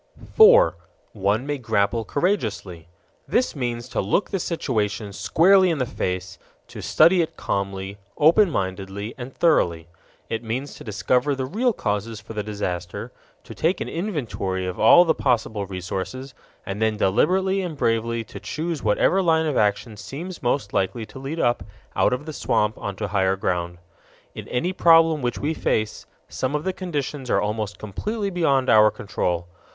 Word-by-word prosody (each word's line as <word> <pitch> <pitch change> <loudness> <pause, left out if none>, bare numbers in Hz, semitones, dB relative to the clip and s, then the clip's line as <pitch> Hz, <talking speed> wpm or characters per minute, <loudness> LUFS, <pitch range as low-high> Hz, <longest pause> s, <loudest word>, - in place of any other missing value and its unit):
4. 485 +3 +7 0.4
One 105 +4 0
may 145 -1 -3
grapple 110 -1 0
courageously. 110 - -2 0.4
This 250 - +1
means 120 -3 -3
to - - -1
look 105 - 0
the 195 - -1
situation 110 - -2
squarely 185 - +4
in 165 - 0
the 130 - 0
face, 90 -6 -4 0.3
to - - -8
study 170 +3 +4
it 160 - -4
calmly, 100 0 -3 0.2
open 170 +7 +5
mindedly, 95 - -4
and 125 0 -7
thoroughly. 85 - +1 0.4
It 115 +1 -3
means 125 +5 -4
to - - -11
discover 125 +6 0
the 130 -1 -3
real 230 - +1
causes 105 - -3
for 105 +2 -10
the 105 - -2
disaster, 90 -4 -4 0.3
to - - -10
take 175 +3 0
an - - -3
inventory 125 - -3
of 90 -1 -5
all 175 +11 +7
the 160 - +3
possible 110 -5 -1
resources, 95 +8 -5 0.3
and 100 +2 -5
then 110 -1 +1
deliberately 185 - +2
and 170 -5 -5
bravely 115 0 0
to 110 - -10
choose 160 -2 -4
whatever 110 - +2
line 160 -3 +2
of 150 -3 -1
action 105 +1 0
seems 145 - -7
most 120 -4 -1
likely 110 +4 -1
to 130 - -11
lead 140 +5 -5
up 120 -4 +1 0.3
out - - +3
of 125 +4 -2
the 155 - -6
swamp 105 -6 0
onto 100 +1 -4
higher 95 -2 +1
ground. 90 -2 -2 0.6
In - - -8
any 170 +9 -1
problem 165 -3 +5
which 120 -1 -2
we 150 +3 -1
face, 110 -8 -2 0.2
some 130 +3 -2
of 150 - -2
the 190 - -1
conditions 145 -7 -4
are - - +3
almost 105 -1 -3
completely 200 - -4
beyond 140 -7 +1
our 110 -1 +6
control. 90 -4 -3
120 Hz, 165 wpm, -23 LUFS, 100-160 Hz, 0.6 s, 4